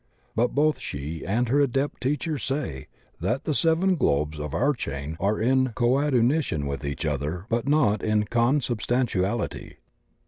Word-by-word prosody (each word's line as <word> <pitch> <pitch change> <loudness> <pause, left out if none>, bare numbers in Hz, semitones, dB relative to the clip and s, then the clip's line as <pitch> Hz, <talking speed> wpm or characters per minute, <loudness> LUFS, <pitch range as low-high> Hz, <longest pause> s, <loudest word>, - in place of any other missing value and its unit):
But 120 +2 +1
both 150 +1 +2
she 75 +3 -5
and 120 +6 +1
her 140 +4 +3
Adept 135 0 0
teachers 145 +3 -1
say 130 - -3 0.3
that 130 +6 -1
the 155 - -1
seven 165 +5 +3
globes 75 - 0
of 75 -1 -4
our 145 - +2
chain 70 - -5
are 100 +4 +1
in 130 +2 +2
''coadunition 125 - +2
with 70 +1 -4
each 70 +1 -3
other 75 +5 -2
but 115 +2 -1
not 140 -8 +3
in 110 -1 +2
consubstantiality." 120 -3 0
120 Hz, 145 wpm, -25 LUFS, -, 0.3 s, her